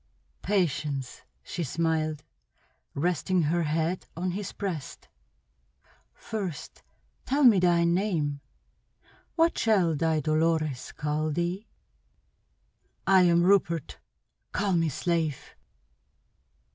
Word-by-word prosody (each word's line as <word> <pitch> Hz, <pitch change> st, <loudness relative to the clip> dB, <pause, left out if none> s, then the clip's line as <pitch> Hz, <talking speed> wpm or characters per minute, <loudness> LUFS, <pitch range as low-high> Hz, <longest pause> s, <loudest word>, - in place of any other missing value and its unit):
"Patience," 150 Hz, -9 st, -1 dB, 0.2 s
she 175 Hz, -, -4 dB
smiled, 155 Hz, 0 st, -1 dB, 0.7 s
resting 175 Hz, +3 st, +1 dB
her 170 Hz, +3 st, +1 dB
head 160 Hz, +3 st, -1 dB
on 180 Hz, +1 st, -1 dB
his 200 Hz, +2 st, -4 dB
breast. 175 Hz, -9 st, -6 dB, 1.1 s
"First 195 Hz, -8 st, -6 dB, 0.4 s
tell 285 Hz, +2 st, +1 dB
me 230 Hz, -7 st, +7 dB
thy 175 Hz, -1 st, +3 dB
name. 170 Hz, -5 st, 0 dB, 0.9 s
What 335 Hz, 0 st, +2 dB
shall 190 Hz, -8 st, +3 dB
thy 160 Hz, +1 st, +1 dB
Dolores 155 Hz, -3 st, 0 dB
call 150 Hz, +1 st, -2 dB
thee?" 175 Hz, +6 st, -2 dB, 1.4 s
"I 190 Hz, -1 st, +6 dB
am 170 Hz, 0 st, +4 dB
Rupert. 175 Hz, -5 st, +1 dB, 0.5 s
Call 200 Hz, -1 st, 0 dB
me 165 Hz, -2 st, +2 dB
slave!" 160 Hz, -1 st, -2 dB
170 Hz, 95 wpm, -27 LUFS, 155-185 Hz, 1.4 s, me